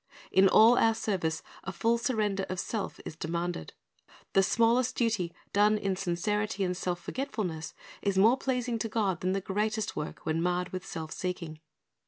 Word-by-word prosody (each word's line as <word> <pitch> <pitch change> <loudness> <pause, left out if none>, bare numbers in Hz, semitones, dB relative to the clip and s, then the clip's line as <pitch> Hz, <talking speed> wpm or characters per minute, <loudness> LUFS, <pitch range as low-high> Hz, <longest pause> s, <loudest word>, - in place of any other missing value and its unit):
In 190 0 +6
all 225 +5 +7
our 225 0 +4
service 185 -8 -1 0.2
a 190 - -4
full 230 +5 +1
surrender 210 -5 0
of 185 -1 -3
self 215 +1 -3
is - - -6
demanded. 170 - -3 0.6
The 195 - +6
smallest 235 +5 +3
duty 215 -8 0 0.2
done 210 +1 +4
in 195 -2 -1
sincerity 200 +3 -1
and 180 -1 0
self 180 -1 -2
forgetfulness, 200 - -4 0.3
is 200 -2 0
more 225 +7 +6
pleasing 250 -3 -1
to 225 - -2
God 200 -5 0
than 185 +1 +1
the 195 - -1
greatest 210 +3 -1
work 150 - -5
when 160 +1 0
marred 180 +1 0
with 185 +1 -6
self 160 -2 -6
seeking. 170 -4 -4
195 Hz, 170 wpm, -29 LUFS, 180-220 Hz, 0.6 s, all